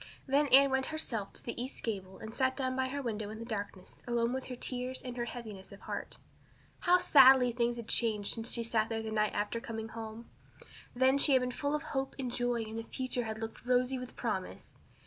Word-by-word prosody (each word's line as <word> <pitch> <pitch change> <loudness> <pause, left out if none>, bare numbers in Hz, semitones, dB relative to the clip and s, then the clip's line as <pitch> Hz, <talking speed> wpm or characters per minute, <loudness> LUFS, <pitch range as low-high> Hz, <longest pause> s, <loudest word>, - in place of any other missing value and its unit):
Then 285 +2 +3
Anne 275 +1 +7
went 265 0 +1
herself 230 -10 -2
to - - -8
the 235 0 -4
east 255 +2 -6
gable 190 -4 -4
and 220 0 -8
sat 260 0 +1
down 260 -2 -1
by 260 0 +1
her 280 +2 -4
window 215 -3 -3
in 215 - -7
the 230 - -7
darkness 205 -4 -6
alone 235 0 +1
with 260 0 -3
her 250 - -6
tears 250 +1 -3
and 250 -1 -6
her 240 -1 -2
heaviness 215 -6 -8
of 200 - -12
heart. - - -5 0.6
How 355 0 +5
sadly 265 -6 +7
things 235 0 0
had 235 -1 -7
changed 215 -4 +1
since 225 0 -2
she 235 - +2
had 230 - -5
sat 220 -1 +2
there 225 -1 -2
the 220 - -4
night 215 -1 +1
after 210 +3 -1
coming 225 -1 -5
home! 225 +1 -7 0.7
Then 260 +2 +4
she 280 - +4
had 260 - +5
been 250 0 -1
full 285 +3 -1
of 300 - -3
hope 270 -1 -3
and 255 -3 -3
joy 245 -2 0
and 220 +1 -5
the - - -5
future 255 -1 -2
had 220 0 -4
looked 225 0 -6
rosy 250 +1 +2
with 250 0 -8
promise. - - -4
240 Hz, 230 wpm, -32 LUFS, 220-260 Hz, 0.7 s, Anne